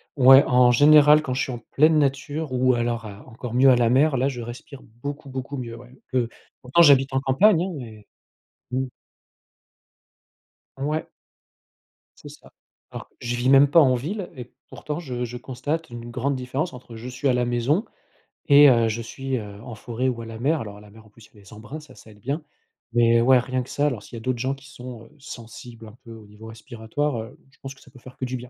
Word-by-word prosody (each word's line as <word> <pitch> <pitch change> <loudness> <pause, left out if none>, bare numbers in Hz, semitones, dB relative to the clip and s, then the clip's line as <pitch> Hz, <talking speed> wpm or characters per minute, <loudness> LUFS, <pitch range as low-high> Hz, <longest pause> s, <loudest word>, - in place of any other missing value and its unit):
Ouais, 135 0 +8
en 125 -1 +4
général 150 +3 +6
quand 130 - -3
je 130 - -1
suis 130 - -2
en 120 - -6
pleine 155 +2 +4
nature 145 +1 -1
ou 130 0 +2
alors 120 -1 -2
à 100 -1 -11
encore 120 +1 -8
mieux 135 +1 +6
à - - +5
la 120 -1 +2
mer, 135 +3 +3
là, 130 +2 +1
je 125 -3 -4
respire 125 +4 -10 0.2
beaucoup 140 0 -6
beaucoup 130 +2 -6
mieux 115 -2 -6
ouais. 120 +1 -14 0.2
Peu 125 -3 0 0.3
pourtant 130 +7 +3
j'habite 140 -3 +5
en 135 - +2
campagne, 170 +7 +3
hein, 190 - -4
mais, 110 -5 -11 0.7
mmh. 130 +1 -1 1.9
Ouais. 150 +3 -3 1.1
C'est - - -11
ça. - - -16 0.4
Alors - - -9
qu 120 - -8
je 120 - -1
vis 120 +1 -1
même 140 +1 +7
pas 165 - +6
en 130 -4 +5
ville 175 - -4
et 125 -1 -10 0.2
pourtant 150 +2 -6
je 125 -6 -5
je 120 +1 -6
constate 145 +6 -4
une 120 0 -8
grande 135 +3 -2
différence 130 +6 -3
entre 120 -2 -12
je 115 +3 -9
suis 135 +3 -3
à 130 - +3
la 125 0 0
maison 120 - 0 0.6
et 145 0 +8
heu, 115 -2 +3
je 115 +2 -3
suis, 135 +3 -4
heu, 105 -2 -9
en 120 -1 -9
forêt 120 +4 -3
ou 115 -2 -4
à - - -8
la 115 0 -9
mer. 150 +5 0
Alors 105 -2 -8
à - - -14
la 105 - -16
mer 110 +1 -17
en - - -19
plus 110 +1 -18
il - - -33
y - - -19
a - - -16
les 100 - -16
embruns, 110 +9 -9
ça 145 -4 -16
ça 110 - -16
aide 105 - -19
bien. 140 +9 -3 0.5
Mais 115 -1 +4
ouais 130 +1 +5
rien 130 +1 -2
que 125 - -10
ça 145 - -1
alors 120 -8 -3
s'il 115 - -12
y - - -6
a - - -6
d'autres 130 0 -2
gens 130 +2 -1
qui 135 0 -17
sont, 125 -4 -10
heu, - - -20
sensibles 115 -2 -11
un 110 - -15
peu 115 - -13
au 110 -1 -13
niveau 105 +2 -14
respiratoire, 115 +4 -4
heu, 110 - -11
je - - -28
pense 135 0 -9
que - - -22
ça 135 - -19
peut 130 - -16
faire 130 +1 -14
que 130 - -3
du 130 0 -4
bien. 125 0 -11
125 Hz, 240 wpm, -23 LUFS, 115-140 Hz, 1.9 s, Ouais